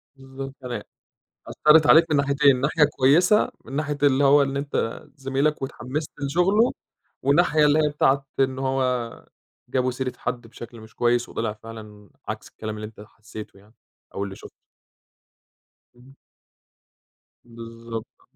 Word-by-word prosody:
بالضبط، 135 Hz, 0 st, -9 dB
يعني 125 Hz, -2 st, -5 dB, 0.6 s
أثّرت 155 Hz, 0 st, +4 dB
عليك 160 Hz, +2 st, +7 dB
من 150 Hz, -, +3 dB
ناحيتين، 140 Hz, -2 st, +3 dB
ناحية 150 Hz, +2 st, +3 dB
كويسة، 170 Hz, +11 st, +4 dB
من 125 Hz, -, -11 dB
ناحية 145 Hz, -1 st, -2 dB
اللي 140 Hz, 0 st, +4 dB
هو 140 Hz, +1 st, +6 dB
إن 135 Hz, 0 st, -2 dB
أنت 140 Hz, -5 st, -2 dB
زميلك 135 Hz, +2 st, -1 dB
واتحمست 135 Hz, +4 st, -4 dB
لشُغله، 180 Hz, -, +2 dB, 0.5 s
والناحية 150 Hz, +2 st, +3 dB
اللي 150 Hz, +1 st, +4 dB
هي 150 Hz, -1 st, +3 dB
بتاعة 140 Hz, -2 st, +1 dB
إن 130 Hz, -1 st, +1 dB
هو 130 Hz, -3 st, -2 dB, 0.4 s
جابوا 130 Hz, -1 st, 0 dB
سيرة 130 Hz, 0 st, -3 dB
حد 125 Hz, -2 st, -4 dB
بشكل 115 Hz, 0 st, -11 dB
مش 110 Hz, 0 st, -15 dB
كويس، 120 Hz, 0 st, +1 dB
وطلع 115 Hz, -2 st, -3 dB
فعلًا 105 Hz, -2 st, -12 dB, 0.2 s
عكس -, -, -5 dB
الكلام 110 Hz, 0 st, -7 dB
اللي 105 Hz, -, -6 dB
أنت 105 Hz, -1 st, -14 dB
حسّيته 110 Hz, -1 st, -11 dB
يعني، 105 Hz, +3 st, -22 dB, 0.4 s
أو 100 Hz, -, -2 dB
اللي 95 Hz, -1 st, -8 dB
شُفته. -, -, -12 dB, 1.5 s
إمم. 130 Hz, +2 st, -18 dB, 1.3 s
بالضبط. 115 Hz, -1 st, -9 dB
130 Hz, 135 wpm, -24 LUFS, 115-145 Hz, 1.5 s, عليك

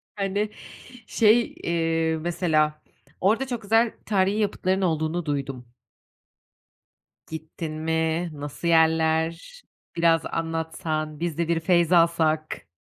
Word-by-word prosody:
hani, 200 Hz, +1 st, -1 dB, 0.6 s
şey, 225 Hz, +2 st, +3 dB
eee, 165 Hz, -1 st, 0 dB
mesela, 155 Hz, -3 st, 0 dB, 0.4 s
orada 220 Hz, +8 st, +2 dB
çok 245 Hz, -3 st, -4 dB
güzel 225 Hz, +2 st, +2 dB
tarihî 195 Hz, 0 st, +1 dB
yapıtların 190 Hz, -2 st, 0 dB
olduğunu 160 Hz, -1 st, -1 dB
duydum. 135 Hz, -4 st, -4 dB, 1.6 s
Gittin 160 Hz, 0 st, -6 dB
mi, 160 Hz, +1 st, 0 dB
nasıl 145 Hz, +3 st, -6 dB
yerler? 160 Hz, -, +2 dB, 0.3 s
Biraz 165 Hz, -1 st, +3 dB
anlatsan, 160 Hz, -2 st, -3 dB
biz 170 Hz, -2 st, -3 dB
de 170 Hz, -1 st, 0 dB
bir 170 Hz, -1 st, +1 dB
feyzalsak. 165 Hz, -2 st, +2 dB
165 Hz, 100 wpm, -25 LUFS, 160-185 Hz, 1.6 s, şey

